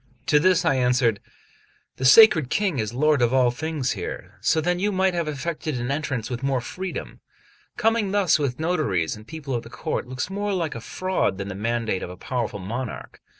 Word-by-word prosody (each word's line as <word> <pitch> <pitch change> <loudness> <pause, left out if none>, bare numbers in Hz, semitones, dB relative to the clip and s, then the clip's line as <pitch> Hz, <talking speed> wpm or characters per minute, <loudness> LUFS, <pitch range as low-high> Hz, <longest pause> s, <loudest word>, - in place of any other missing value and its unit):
To 150 - +4
this 185 +2 +3
I 135 - +3
answered: 125 -4 +2 0.8
"The 130 - -3
sacred 160 - +7
King 190 - 0
is 110 -1 -2
lord 150 +2 +2
of 120 +2 +3
all 125 -2 +4
things 145 -1 -2
here: 95 0 -6
so 145 +8 +2
then 175 +3 0
you 205 +2 +1
might 190 -1 +2
have 170 -2 -1
effected 155 -1 -3
an 120 +2 -2
entrance 140 -6 -2
with 125 -1 -5
more 135 -1 +1
freedom: 185 +9 -6 0.6
coming 225 -2 +2
thus 195 -5 +3
with 135 -3 -2
notaries 150 - 0
and 105 +1 -14
people 150 -4 -6
of 120 - -1
the 115 - -12
court 125 - -3
looks 130 +1 -3
more 205 +1 -2
like 170 -5 -1
a 115 - -7
fraud 185 - -1
than 100 0 -5
the - - -4
mandate 115 -1 -1
of - - -5
a 90 - -9
powerful 120 -1 -3
monarch. 115 +6 -6
135 Hz, 200 wpm, -24 LUFS, 120-170 Hz, 0.8 s, sacred